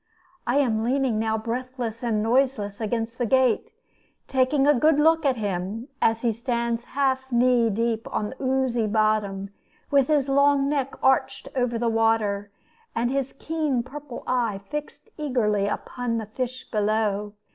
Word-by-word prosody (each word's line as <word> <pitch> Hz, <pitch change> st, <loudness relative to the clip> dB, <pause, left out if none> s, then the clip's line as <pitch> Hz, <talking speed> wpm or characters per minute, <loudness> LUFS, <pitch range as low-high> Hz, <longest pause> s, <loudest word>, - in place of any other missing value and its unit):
I 245 Hz, -, +1 dB
am 235 Hz, -6 st, +2 dB
leaning 255 Hz, -2 st, +1 dB
now 220 Hz, 0 st, 0 dB
breathless 235 Hz, 0 st, -4 dB
and 220 Hz, -3 st, 0 dB
noiseless 230 Hz, -4 st, +1 dB
against 225 Hz, +2 st, -2 dB
the 240 Hz, -, +1 dB
gate, 260 Hz, -1 st, +2 dB, 0.6 s
taking 270 Hz, +1 st, +2 dB
a 295 Hz, -, +6 dB
good 300 Hz, +3 st, +3 dB
look 320 Hz, 0 st, +4 dB
at 260 Hz, -2 st, +1 dB
him, 205 Hz, +4 st, -3 dB
as 225 Hz, 0 st, +2 dB
he 235 Hz, -, +3 dB
stands 235 Hz, 0 st, -2 dB
half 265 Hz, -1 st, -1 dB
knee 240 Hz, -1 st, +4 dB
deep 225 Hz, +1 st, -1 dB
on 210 Hz, -, -2 dB
the 265 Hz, -, -11 dB
oozy 260 Hz, -4 st, +1 dB
bottom, 210 Hz, -2 st, 0 dB, 0.4 s
with 275 Hz, -2 st, +4 dB
his 290 Hz, -3 st, +2 dB
long 280 Hz, 0 st, +3 dB
neck 275 Hz, -2 st, -1 dB
arched 265 Hz, +1 st, +2 dB
over 245 Hz, -2 st, 0 dB
the 235 Hz, +1 st, 0 dB
water, 225 Hz, -3 st, +1 dB, 0.5 s
and 240 Hz, +2 st, 0 dB
his 275 Hz, -1 st, -1 dB
keen 300 Hz, -5 st, -1 dB
purple 275 Hz, -1 st, -8 dB
eye 235 Hz, -6 st, 0 dB
fixed 300 Hz, +8 st, -6 dB
eagerly 215 Hz, -8 st, +1 dB
upon 235 Hz, +2 st, -3 dB
the 220 Hz, -, -3 dB
fish 255 Hz, +4 st, -5 dB
below. 210 Hz, -1 st, 0 dB
240 Hz, 155 wpm, -25 LUFS, 220-265 Hz, 0.6 s, a